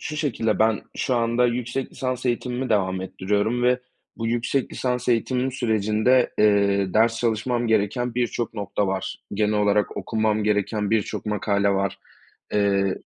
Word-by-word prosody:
Şu 150 - -5
şekilde 115 -8 0
ben 110 -1 +3 0.2
şu 130 - 0
anda 120 +1 +2
yüksek 125 +2 -2
lisans 130 -1 -3
eğitimimi 125 +1 -1
devam 95 -3 +1
ettiriyorum 100 +5 -1
ve 125 0 +3 0.4
bu 115 - -3
yüksek 120 +3 -1
lisans 125 -1 -2
eğitimim 125 +2 +1
sürecinde, 110 +1 +2
eee, 100 -2 +3
ders 115 +1 +3
çalışmam 120 +1 0
gereken 110 +3 0
birçok 120 -2 -2
nokta 100 -1 -2
var. 95 0 -3 0.2
Genel 105 +1 +1
olarak 105 0 +1
okumam 110 -1 0
gereken 105 0 0
birçok 110 -1 -1
makale 100 -1 +1
var. 100 0 -1 0.6
Eee, 100 -2 +2
110 Hz, 140 wpm, -24 LUFS, 100-125 Hz, 0.6 s, ben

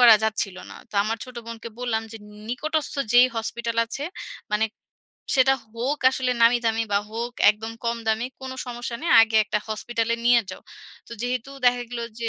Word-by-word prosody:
করা 240 -2 +10
যাচ্ছিল 210 -3 -1
না। - - -10
তো - - -16
আমার 225 +2 -1
ছোট 250 -1 -12
বোনকে 230 0 -7
বললাম 230 -3 -1
যে, - - -7 0.3
নিকটস্থ 310 +6 -2 0.2
যেই 245 +1 +8
হসপিটাল 230 +1 -3
আছে, 275 +5 -5 0.5
মানে 210 +1 +3 0.7
সেটা 265 0 +5 0.2
হোক 265 +6 -1
আসলে 260 -1 -1
নামি 235 +1 +6
দামি 225 0 +2
বা 200 - +4
হোক 235 +2 -3 0.2
একদম 220 +2 -6
কম 235 0 0
দামি, 220 +2 +1
কোন 265 0 -6 0.2
সমস্যা 240 0 -5
নেই, 335 - -1
আগে 220 -1 +1
একটা 210 - 0
হসপিটালে 230 +1 -1
নিয়ে 240 -1 +6
যাও। 185 - -9 0.5
তো - - -9
যেহেতু 250 +1 -2 0.2
দেখা 245 0 +4
গেল 240 -1 -4 0.2
যে, - - -1
235 Hz, 180 wpm, -24 LUFS, 225-245 Hz, 0.7 s, করা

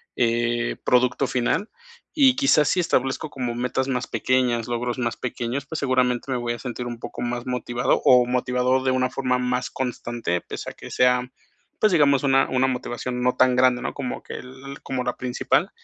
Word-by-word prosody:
eh, 120 0 0
producto 125 +2 +3
final. 130 - 0 0.4
Y, 270 -5 +5
quizás, 210 - +4
si 185 - +2
establezco 135 -3 0
como 125 -3 -3
metas 125 +2 -1
más 125 -1 -1
pequeñas, 125 -3 0
logros 120 +1 -2
más 120 -1 -1
pequeños, 125 +2 -3
pues, 160 +2 -5
seguramente, 130 -1 +1
me 125 - 0
voy 120 -1 -2
a 120 - -7
sentir 125 -1 -5
un 120 -1 -6
poco 120 - -7
más 120 0 -3
motivado 125 -1 0
o 125 -1 +6
motivado 125 +1 +1
de 130 - +2
una 130 0 +1
forma 125 -2 0
más 125 0 -1
constante 120 -7 -3
pese - - -7
a - - -10
que - - -11
sea, 125 0 +3 0.5
pues, 215 - +4
digamos, 145 -5 +4
una 135 -1 +3
una 130 0 +2
motivación 125 -1 -3
no 125 0 +2
tan 130 -1 +4
grande, 125 -1 +4
¿no?, - - -3
como 130 -3 -5
que - - -8
el 135 +2 -9
como 130 -1 -3
la - - -3
principal. 125 -1 0
125 Hz, 190 wpm, -23 LUFS, 120-130 Hz, 0.5 s, o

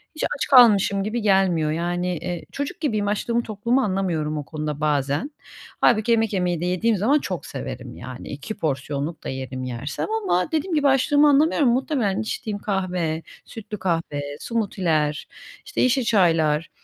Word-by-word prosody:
hiç 310 - -4
aç - - -2
kalmışım 205 -6 +6
gibi 220 +4 -2
gelmiyor. 190 -6 +2
Yani, 175 +2 -1
eee, 175 +2 -5
çocuk 285 0 -4
gibiyim, 215 -9 0
açlığımı, 230 +3 0
tokluğumu 235 +5 0
anlamıyorum 180 -7 -1
o 145 - -4
konuda 150 -1 -4
bazen. 145 - 0 0.5
Hâlbuki 225 0 +3
yemek 225 -2 +2
yemeyi 180 -3 0
de - - -1
yediğim 190 +5 +1
zaman 260 +10 +3
çok 185 - -5
severim, 125 -2 -7
yani 125 +1 -9
2 145 +9 -6
porsiyonluk 145 -1 -3
da - - -4
yerim 130 -1 -5
yersem 125 +3 -4 0.2
ama 180 - +1
dediğim 320 +3 -1
gibi, 290 -2 +3
açlığımı 285 +2 +4
anlamıyorum. 290 -1 +4
Muhtemelen 245 -5 0
içtiğim 215 -1 -4
kahve, 180 -6 -2 0.2
sütlü 215 -1 -8
kahve, 165 -5 -1 0.2
smoothie'ler 170 -10 -1 0.4
işte 420 - -2
yeşil 255 +1 +3
çaylar, 165 -7 +2
190 Hz, 155 wpm, -23 LUFS, 155-230 Hz, 0.5 s, kalmışım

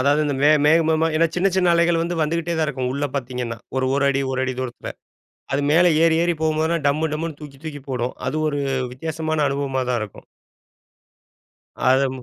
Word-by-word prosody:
அதாவது 145 +3 +3
இந்த 145 -2 -1
மே 150 - +6 0.2
மேகமாக 160 0 +3
ஏன்னா 165 +1 +4
சின்ன, 190 +2 +3
சின்ன 180 -2 +3
அலைகள் 170 0 +3
வந்து 175 +1 -2
வந்துகிட்டே 170 +2 -1
தான் 155 - +2
இருக்கும் 130 -3 -2
உள்ள 145 +1 -1
பாத்தீங்கன்னா, 125 -3 -4 0.2
ஒரு 130 - 0
1 140 0 +1
அடி, 135 0 +1
ஒரு 130 0 -1
1 130 -1 -2
தூரத்தில. 125 -2 -6 0.6
அது 140 - +1
மேல 175 +3 +5 0.2
ஏறி, 165 -1 +4
ஏறி 175 0 +2
போகும்போதுலாம் 160 0 0
டம்மு 155 +2 +1
டம்முனு 160 -1 -4
தூக்கி, 140 -2 -10
தூக்கி 145 -3 -6
போடும். 125 -1 -2
அது 150 +4 -1
ஒரு 145 -1 -2 0.3
வித்தியாசமான 160 +2 -2
அனுபவமா 135 -1 -1
தான் 120 -2 +1
இருக்கும். 105 - -11 1.5
அத 135 +1 +2
150 Hz, 180 wpm, -22 LUFS, 135-160 Hz, 1.5 s, மே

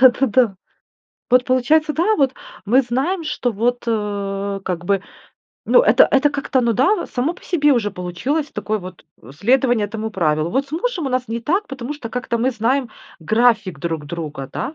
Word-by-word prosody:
Да 260 - +10
да 270 +3 0
да. 225 -4 +2 0.8
Вот, 250 0 +5
получается, 300 +5 +2
да, 400 +7 +2
вот 270 -3 +2 0.3
мы 250 +6 +4
знаем, 275 +9 -1
что 255 -5 -2
вот, 240 +4 -1
э, 200 -2 -2
как 175 -2 -3
бы, 195 0 +1 0.7
ну, - - +6
это - - +5
это 285 +1 +3
как-то, 275 -2 0
ну 235 -1 +2
да, 345 - +2
само 275 +8 -2
по - - -18
себе 295 -5 +3
уже 220 -5 +1
получилось 205 - -3
такое 215 0 -2
вот, 185 -2 -11 0.2
э, 120 - -13
следование 240 - +2
этому 220 +1 -5
правилу. 155 -4 0
Вот 270 +8 0
с - - -18
мужем 345 - -2
у - - 0
нас 255 -1 -1
не 230 +1 -3
так, 370 - 0
потому 270 +1 -5
что 270 -6 -7
как-то 245 -1 -3
мы 250 +3 +1
знаем 250 +2 0 0.3
график 220 - +2
друг 160 -1 -4
друга, 150 -4 -6
да? 305 - -4
245 Hz, 190 wpm, -20 LUFS, 200-275 Hz, 0.8 s, Да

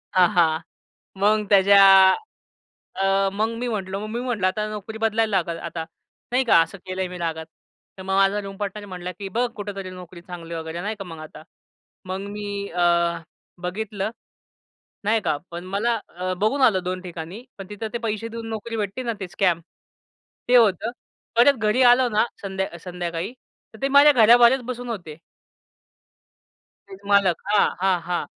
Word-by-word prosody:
हां, 180 -1 +6
हां. 160 -2 +3 0.6
मग 210 +1 +3
त्याच्या 200 0 +6
आ 190 -1 +8 0.8
अ, 195 0 +2
मग 215 +2 0
मी 245 +1 -3
म्हटलं, 195 -4 -3
मग 215 - -5
मी 240 - -2
म्हटलं 225 -7 0
"आता 210 +3 -1
नोकरी 215 +1 -7
बदलायला 225 0 +1
लागल 170 -1 -2
आता." 165 -1 -5 0.5
नाही 255 +2 +2
का. 170 - +6
असं 165 +4 -3
केलंय 185 0 -3
मी 180 0 -8
रागात. 160 -2 -3 0.5
तर 190 - -8
मग 190 0 -3
माझा 195 +1 +3
रुम 195 0 -8
पार्टनर 205 0 -5
म्हटला 180 -1 -6
की 195 - -5
"बघ 245 0 +2
कुठेतरी 200 -2 -6
नोकरी 180 -1 -11
चांगली." 170 -2 -9
वगैरे 160 +1 -5
नाही 215 +3 -3
का - - -4
मग 165 -2 -9
आता. 155 0 -11 0.6
मग 190 +1 -4 0.2
मी 205 0 -5 0.2
अ, 175 +1 0 0.8
बघितलं. 200 +2 -3 0.9
नाही 215 +2 +2
का. 145 - +1
पण 170 +1 -6
मला 230 +3 +1
अ, 185 +1 -4
बघून 215 +9 0
आलं 190 -8 +4
2 185 0 -3
ठिकाणी 175 +5 -8
पण 195 0 -9
तिथं 210 +2 -5
ते - - 0
पैसे 215 +1 -3
देऊन 230 0 -7
नोकरी 225 +1 -5
भेटते 205 +4 -3
ना 235 -2 -1
ते 190 - -5
स्कॅम, 175 -2 +1 0.9
ते 250 - +5
होतं. 220 0 +3 0.4
परत 265 +4 +6
घरी 220 +3 +1
आलो 250 -1 +2
ना 215 +1 +2 0.2
संध्या 190 -3 -4
संध्याकाळी 175 +3 -5 0.4
तर 220 - -14
ते 275 - +1
माझ्या 285 +2 +7
घराबाहेरच 240 +1 +6
बसून 245 -1 -5
होते 170 -8 -6 1.7
ते 385 - -10 0.2
मालक. 195 -4 +4 0.2
हां, 210 - +5
हां, 190 -2 +2
हां. 175 - -1
195 Hz, 170 wpm, -23 LUFS, 180-220 Hz, 1.7 s, आ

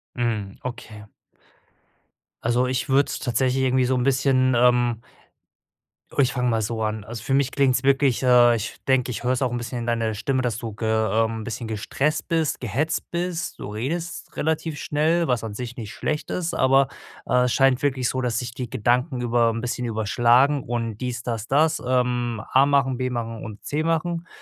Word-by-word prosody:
Mhm, 110 -5 -2
okay. 110 -4 -7 1.4
Also, 120 +2 +2
ich 130 +1 -2
würde 135 +1 +4
es - - -4
tatsächlich 130 +2 0
irgendwie 130 -1 +2
so 130 - +1
'n 125 - 0
bisschen, 130 -1 +2
ähm 120 -1 +3 1.2
Ich 130 -2 +3
fange 125 -1 0
mal 115 -1 +1
so 110 +1 -2
an. 110 -1 -3
Also, 115 0 -7
für 135 - -1
mich 135 -1 +2
klingt 135 -2 +3
es 125 - -1
wirklich 135 -2 +3
äh, 120 -2 +6
ich 110 - -6
denke, 130 -2 +2
ich 115 - -5
höre 125 - +1
es 130 - 0
auch 130 - +2
'n 120 - -2
bisschen 120 +1 -5
in 115 - -4
deiner 115 -2 0
Stimme, 130 +5 -1
dass 120 -4 -1
du 115 -3 -6
ge 110 +2 -5
ähm, 110 +1 +1
'n - - -6
bisschen 115 0 -5
gestresst 135 +8 -1
bist, 165 -3 0
gehetzt 150 +7 -2
bist. 175 0 -3
Du - - -6
redest 160 +11 -4
relativ 160 0 -1
schnell, 160 +4 +1
was 125 -3 +1
an 110 - -5
sich 125 +2 -6
nicht 110 -4 -6
schlecht 150 -1 -3
ist, 170 -2 -2
aber, 135 0 +3 0.4
äh, 125 0 +3
es 125 - 0
scheint 135 -1 +3
wirklich 130 -3 0
so, 130 - -2
dass 120 -2 0
sich 125 -2 -5
die 125 -1 -5
Gedanken 125 +4 0
über 120 -1 +2
'n 115 - -4
bisschen 125 0 -3
überschlagen 120 +6 +3
und 115 -3 -3
dies, 125 -1 -4
das, 115 -2 -3
das, 155 +3 +2
ähm, 125 -2 0
A 135 +1 +6
machen, 140 -3 +2
B 130 0 -1
machen 115 -2 -4
und 110 -1 -9
C 150 +2 -2
machen. 165 +1 -1
125 Hz, 200 wpm, -23 LUFS, 115-135 Hz, 1.4 s, äh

